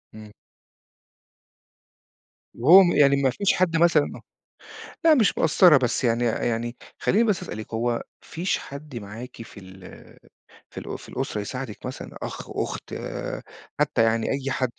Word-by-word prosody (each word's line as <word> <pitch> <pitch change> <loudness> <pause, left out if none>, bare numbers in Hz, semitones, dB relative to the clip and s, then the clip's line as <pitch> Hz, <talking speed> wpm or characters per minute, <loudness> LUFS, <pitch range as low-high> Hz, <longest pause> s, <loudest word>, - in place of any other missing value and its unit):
إمم. 105 -1 -11 2.2
وهو 170 +11 +8
م 175 - +2
يعني 140 -3 +5
ما 135 - +3
فيش 200 +9 +1
حد 170 -2 +1
مثلًا، 165 -3 +3
آه، - - -11 0.8
لأ 320 -2 +6
مش 220 -7 +2
مقصّرة 160 -1 +6
بس 125 0 -1
يعني 115 0 +1
يعني 120 +1 -1 0.2
خليني 220 +4 +2
بس 210 -6 0
أسألِك، 110 +1 -8
هو 120 +2 0
ما - - -4 0.2
فيش 175 +3 -2
حد 140 0 -10
معاكِ 115 +3 -8
في 115 - -11
ال 95 0 -13 0.8
في - - -9
الأ - - -6
في - - -14
الأسرة 105 - -3
يساعدِك 125 +1 -6
مثلًا 130 - -8
أخ، - - -7
أُخت - - -5 0.9
حتى - - +2
يعني 115 0 +1
أي 135 0 -2
حد؟ 130 -3 -1
130 Hz, 150 wpm, -24 LUFS, 115-165 Hz, 2.2 s, وهو